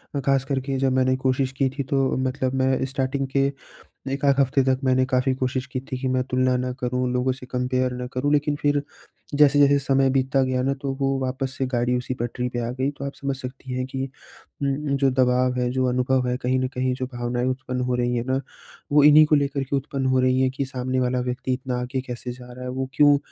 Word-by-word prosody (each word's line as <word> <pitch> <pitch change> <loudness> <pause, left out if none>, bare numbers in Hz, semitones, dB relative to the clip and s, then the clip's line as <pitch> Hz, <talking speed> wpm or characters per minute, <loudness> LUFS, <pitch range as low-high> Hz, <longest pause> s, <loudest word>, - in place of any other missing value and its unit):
अ, - - +1
ख़ास 135 -1 +3
करके 135 0 -2
जब 135 0 +2
मैंने 130 0 +3
कोशिश 130 0 0
की 135 -1 +2
थी 140 +2 -4
तो - - 0 0.2
मतलब 130 0 -1
मैं 130 0 +1
स्टार्टिंग 135 +1 -2
के 140 0 +3 0.6
एक 140 +1 -3
आध 140 - +5
हफ़्ते 135 0 +3
तक 130 0 +1
मैंने 130 0 +3
काफ़ी 130 +1 +1
कोशिश 130 0 -2
की 130 - -2
थी 130 -1 -6
कि 130 - -1
मैं 130 0 +1
तुलना 130 0 +2
ना 125 0 -2
करूँ, 125 0 -1
लोगों 125 +1 +1
से 130 0 -10
कंपेयर 125 0 -1
ना 125 0 -4
करूँ। 140 +3 0
लेकिन 150 0 +2
फिर 145 -1 +2 0.5
जैसे-जैसे 145 -1 +5
समय 135 -1 +2
बीतता 135 0 +2
गया 130 -1 0
ना 135 +1 +1
तो 140 -1 -1
वो 135 0 +1
वापस 130 0 -3
से 130 - 0
गाड़ी 120 0 +1
उसी 125 +1 -3
पटरी 120 +1 -2
पे 120 - -3
आ - - -2
गई। 135 +2 +1
तो 140 -1 -8
आप 140 - -5
समझ 140 -1 -3
सकती 130 0 -8
हैं 130 - -1
कि 130 0 -3 0.6
उम, 140 +1 0
जो 135 -1 +3
दबाव 125 0 +2
है 125 - +1
जो 130 0 0
अनुभव 125 +1 +1
है 125 - 0
कहीं 130 +1 +1
न 130 - 0
कहीं 125 0 0
जो 130 0 -3
भावनाएँ 120 +1 -1
उत्पन्न 130 0 -2
हो - - +2
रही 120 0 0
है 120 - -1
ना 130 +1 0 0.5
वो 145 0 +6
इन्हीं 150 +1 +8
को 150 - +3
लेकर 140 -1 +1
के 135 +1 -1
उत्पन्न 135 0 -2
हो 130 0 +3
रही 130 0 +2
हैं। 130 0 +3
कि 135 +2 -3
सामने 130 0 -2
वाला 125 0 0
व्यक्ति 130 +1 -2
इतना 125 -1 -2
आगे 125 +2 -2
कैसे 125 0 -5
जा 125 0 -12
रहा 125 +1 -9
है? 125 - -4
वो 130 +1 -3
क्यों 145 -1 +6
130 Hz, 240 wpm, -24 LUFS, 125-135 Hz, 0.6 s, इन्हीं